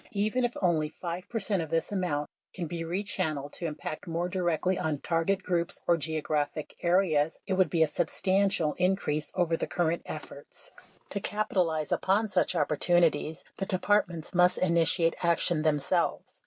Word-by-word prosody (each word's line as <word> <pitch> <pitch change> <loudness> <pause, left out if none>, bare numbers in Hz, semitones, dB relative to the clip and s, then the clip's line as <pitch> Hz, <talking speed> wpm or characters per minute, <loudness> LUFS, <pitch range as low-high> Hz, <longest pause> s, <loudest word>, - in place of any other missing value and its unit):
Even 215 +5 0
if 245 0 -1
only 160 -4 +2
5 175 +3 -6
percent 205 -5 0
of 160 - -5
this 165 +3 -1
amount 165 -7 -1 0.3
can 175 - -3
be 165 +1 -4
re 175 +5 -2
channeled 155 -8 -2
to 170 - -3
impact 155 +1 -6
more 170 +1 -1
directly 180 0 0
on 155 -2 -1
target 180 +4 0
groups 170 -1 -1
or 170 - +4
geo 160 -1 -3
graphic 150 0 -2
areas, 170 -4 +2
it 195 - -1
would 185 -1 +3
be 165 -2 +3
a - - +5
substantial 190 +1 +1
increase 180 -5 0
over 175 -3 +2
the - - -3
cur 175 -2 +1
rent 170 - -1
efforts. - - -9 0.4
To 200 - -1
capitalize 180 -7 -1
upon 210 +3 +2
such 180 -4 +1
opportunities, 160 -1 +2
the 195 - -3
Departments 185 -3 0
must 180 0 +4
initiate 170 -1 +2
action 170 -1 +2
themselves. 150 -2 0
170 Hz, 165 wpm, -29 LUFS, 160-185 Hz, 0.4 s, a